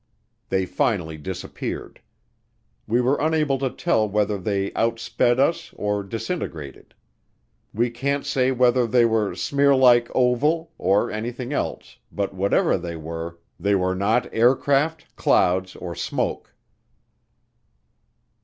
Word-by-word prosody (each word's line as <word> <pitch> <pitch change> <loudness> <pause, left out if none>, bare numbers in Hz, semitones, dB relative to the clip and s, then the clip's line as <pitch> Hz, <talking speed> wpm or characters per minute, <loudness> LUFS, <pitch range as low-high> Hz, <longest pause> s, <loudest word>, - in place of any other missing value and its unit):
They 95 -1 +1
finally 90 -3 -1
disappeared. 95 +3 -6 0.9
We 120 +3 +2
were 130 +4 +1
unable 155 -3 +1
to 135 -1 0
tell 110 -3 0
whether 105 0 0
they 100 +1 -1
outsped 115 +1 +1
us 165 +5 +1
or 105 0 -1
disintegrated. 100 - -6 0.8
We 120 +3 0
can't 140 +4 -2
say 130 0 +1
whether 125 -1 +3
they 120 +1 +4
were 110 -3 +1
"smearlike," 130 -4 +4
oval, 150 +7 +2
or 100 +2 +2
anything 120 +4 -4
else - - -4
but 100 -1 -3
whatever 95 0 +1
they 85 -1 -6
were 80 +1 -6 0.2
they 100 0 +2
were 95 -1 +1
not 110 +6 +1
aircraft, 140 +6 +2
clouds 95 +1 +2
or 85 -1 -6
smoke. - - -3
115 Hz, 115 wpm, -23 LUFS, 95-130 Hz, 0.9 s, they